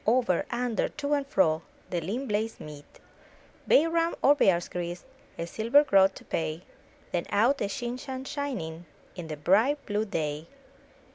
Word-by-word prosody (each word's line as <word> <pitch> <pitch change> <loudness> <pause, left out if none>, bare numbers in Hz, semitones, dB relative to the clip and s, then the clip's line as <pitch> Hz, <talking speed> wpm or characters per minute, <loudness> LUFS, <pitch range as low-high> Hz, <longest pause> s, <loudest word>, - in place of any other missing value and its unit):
Over, 235 -6 +2
under, 240 -2 -1
to 295 -1 -3
and 285 -1 0
fro. 160 - +2 0.3
The 175 -2 -1
lean 220 +11 -3
blades 220 -1 -2
meet; 150 -1 -11 0.7
Bay 300 - +6
Rum 335 0 +1
or 285 - +7
Bear's 185 -11 +2
Grease, 175 0 -5 0.3
A 165 - -3
silver 230 - +3
groat 195 -8 +4
to - - -12
pay 160 +1 -3 0.2
— - - -30
Then 175 - -2
out 235 +7 +2
a - - +1
shin 240 +4 -4
shan 260 0 -6
shining 235 - -4 0.3
In 175 -3 -7
the 155 -1 -5
bright, 220 - +2
blue 210 +1 -1
day. 155 -5 -3
210 Hz, 165 wpm, -28 LUFS, 170-265 Hz, 0.7 s, or